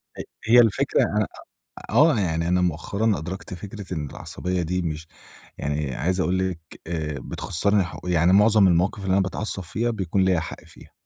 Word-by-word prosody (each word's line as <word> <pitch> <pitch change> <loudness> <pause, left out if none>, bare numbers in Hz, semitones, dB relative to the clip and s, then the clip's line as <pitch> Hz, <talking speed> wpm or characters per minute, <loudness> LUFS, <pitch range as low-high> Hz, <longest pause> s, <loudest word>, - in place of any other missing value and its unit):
ه - - -5 0.3
هي 120 +1 +8
الفكرة، 115 -4 +3
أنا - - 0 0.6
آه، 140 +3 +5
يعني 85 -3 0
أنا 90 +1 +2
مؤخرًا 100 +5 0
أدركت 90 +4 -6
فكرة 100 0 -7
إن 75 -3 -3
العصبية 90 0 -4
دي 90 +2 -1
مش 80 -1 -4 0.5
يعني 75 -2 -2
عايز 90 +3 -1
أقول 95 0 +1
لِك، 85 -3 -6 0.3
آآ 80 -3 -3
بتخسّرني 100 +9 0
ح 90 - -8
يعني 90 0 +3
معظم 105 0 +6
المواقف 90 +3 +1
اللي 95 - 0
أنا 100 - +4
باتعصب 95 +1 -2
فيها، 110 +8 -2
بيكون 95 -3 0
ليّا 95 -3 +3
حق 80 - -7
فيها، - - -16
90 Hz, 175 wpm, -24 LUFS, 85-100 Hz, 0.6 s, هي